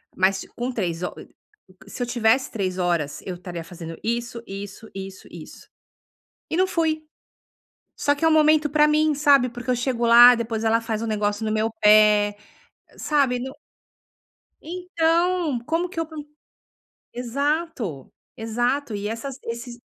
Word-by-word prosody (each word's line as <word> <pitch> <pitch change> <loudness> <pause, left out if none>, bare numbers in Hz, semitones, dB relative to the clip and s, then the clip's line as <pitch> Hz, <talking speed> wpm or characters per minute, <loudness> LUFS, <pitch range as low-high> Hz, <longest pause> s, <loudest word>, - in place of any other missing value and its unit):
mas 190 +1 +2
ti - - -10
com 245 +2 -4
3 180 -7 -3
ho - - -2
co - - -12 0.6
se 250 - -8
eu 245 - -1
tivesse 240 +2 +2
3 190 -4 -3
horas 170 -5 -1
eu 185 - -4
estaria 175 -1 -7
fazendo 165 -1 -9
isso, 235 +1 -3
isso, 200 +2 -8
isso, 195 0 -8
isso". - - -12 0.8
E 320 - -1
não 370 - +4
fui, 320 -3 -1 0.9
só 285 - +1
que 290 - -1
é - - +6
um - - +4
momento 310 -1 +4
pra 300 +1 +4
mim, 305 0 +2
sabe, 280 -3 +4
porque 245 +1 -8
eu - - +2
chego 240 -1 -1
lá 240 +1 +9
depois 225 -1 -3
ela 225 +1 +3
faz 225 -1 -3
um 230 - -3
negócio 210 0 -1
no 215 - -1
meu 220 +1 0
pé, 210 -1 +5 0.6
sabe, 275 -5 +1
não 265 +2 -6 1.1
Então, 340 -3 0
como 335 +3 0
que 350 - -10
eu 330 - -1
po 320 - -14 1.0
Exato, 250 - -3 0.2
exato 240 +3 -1
e 205 0 -3
essas 240 +4 -5
esses 235 +1 -7
240 Hz, 160 wpm, -23 LUFS, 210-295 Hz, 1.1 s, lá